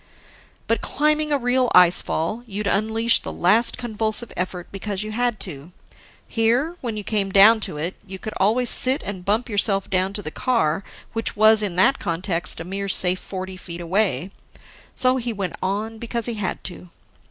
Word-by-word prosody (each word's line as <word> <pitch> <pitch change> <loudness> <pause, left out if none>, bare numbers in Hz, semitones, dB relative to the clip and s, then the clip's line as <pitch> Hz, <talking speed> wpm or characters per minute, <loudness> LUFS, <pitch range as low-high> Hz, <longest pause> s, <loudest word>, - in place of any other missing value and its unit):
But, 230 - 0
climbing 305 0 0
a 290 - +3
real 250 0 +1
ice 180 0 +6
fall, 210 +9 -3
you'd 210 0 -4
unleash 220 +3 +3
the - - -7
last 215 +7 +2
convulsive 220 0 -3
effort 180 -1 -4
because 200 0 -4
you 215 - -6
had 240 0 -1
to. 160 -1 -9 0.5
Here, 240 +9 0
when 230 -4 -4
you 210 - -4
came 200 -2 -1
down 210 +4 +7
to 155 - -3
it, 165 +5 -3
you 190 0 -7
could 215 +3 -7
always 230 +6 +2
sit 260 +2 +3
and 190 -2 -6
bump 215 +6 0
yourself 200 -2 +1
down 185 +1 0
to 205 - -4
the 155 - -6
car 195 -9 0 0.3
which 225 +1 -2
was, 215 0 +6
in 200 -4 -2
that 265 +9 +3
context, 170 0 -3
a - - -5
mere 195 +3 -4
safe 180 0 +5
forty 185 -1 -7
feet 170 -2 -8
away. 185 +1 -1 0.6
So 255 0 +4
he 240 -1 -3
went 195 -4 -4
on 210 +4 -3
because 235 -1 -2
he 240 - -1
had 210 -4 -4
to. 180 0 -9
210 Hz, 185 wpm, -22 LUFS, 185-230 Hz, 0.6 s, down